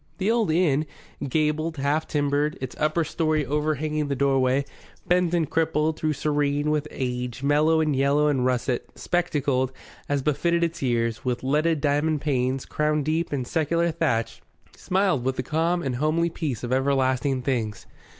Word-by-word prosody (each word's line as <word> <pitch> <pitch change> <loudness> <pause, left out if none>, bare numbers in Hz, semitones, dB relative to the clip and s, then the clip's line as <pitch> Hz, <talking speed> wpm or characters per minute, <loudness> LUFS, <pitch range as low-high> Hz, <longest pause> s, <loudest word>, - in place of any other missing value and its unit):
The 200 +3 +1
old 230 -5 +1
inn, 155 -3 +2 0.4
gabled, 155 +2 0
half 145 +3 0
timbered, 145 +1 0
its 130 - -6
upper 155 +2 +1
story 155 -1 0
overhanging 150 +1 -1
the 140 - -1
doorway, 135 0 +2 0.4
bent 180 -1 +2
and 165 -3 +1
crippled, 160 0 0
though 155 - +1
serene, 145 0 0
with 150 0 0
age, 125 -1 -4
mellow 155 +3 +3
in 155 -2 +1
yellow 140 +2 +2
and 135 -4 +1
russet, 125 -1 -1
spectacled, 145 -7 0 0.4
as 140 -2 0
befitted 170 +4 +1
its 170 0 -2
years, 115 -3 0
with 125 -1 -2
leaded 150 +3 +1
diamond 150 +2 +1
panes, 130 -2 -1
crowned 150 -1 0
deep 160 +2 0
in 135 -4 -2
secular 170 +4 0
thatch, 115 -7 -1 0.3
smiled 185 -8 0
with 130 +1 0
the 130 - -2
calm 165 +5 0
and 130 -3 -2
homely 160 +4 +1
peace 140 -9 -4
of 120 +1 -1
everlasting 130 -1 +1
things. 115 -6 -2
150 Hz, 160 wpm, -25 LUFS, 130-160 Hz, 0.4 s, mellow